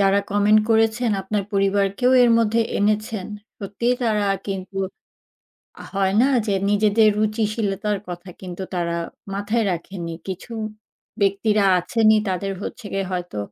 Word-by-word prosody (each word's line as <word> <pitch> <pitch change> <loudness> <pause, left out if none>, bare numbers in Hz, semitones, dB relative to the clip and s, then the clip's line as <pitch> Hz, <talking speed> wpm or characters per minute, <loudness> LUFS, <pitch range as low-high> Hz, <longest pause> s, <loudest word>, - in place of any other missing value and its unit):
যারা 200 0 +4
comment 205 +1 +4
করেছেন 225 +1 +2
আপনার 200 +1 -2
পরিবারকেও 200 +5 +2
এর 240 - +5
মধ্যে 230 0 +2 0.2
এনেছেন। 215 -1 0 0.3
সত্যিই 210 +5 -1
তারা 210 -3 +1 0.2
কিন্তু 195 0 -5 1.0
আ - - -7
হয় 195 0 +1
না 265 - +4 0.2
যে 200 - +1 0.2
নিজেদের 215 +1 +4
রুচিশীলতার 210 -1 0
কথা 175 +1 -7
কিন্তু 185 0 -7
তারা 170 -1 -1 0.4
মাথায় 210 +3 0
রাখেননি। 170 -1 -5
কিছু 190 +5 -6 0.7
ব্যক্তিরা 200 +1 +2
আছেনই 220 +4 +3
তাদের 195 +1 -2
হচ্ছে 220 - -7
গিয়ে 195 -1 -1
হয়তো 175 -10 -4
205 Hz, 130 wpm, -22 LUFS, 195-215 Hz, 1.0 s, এর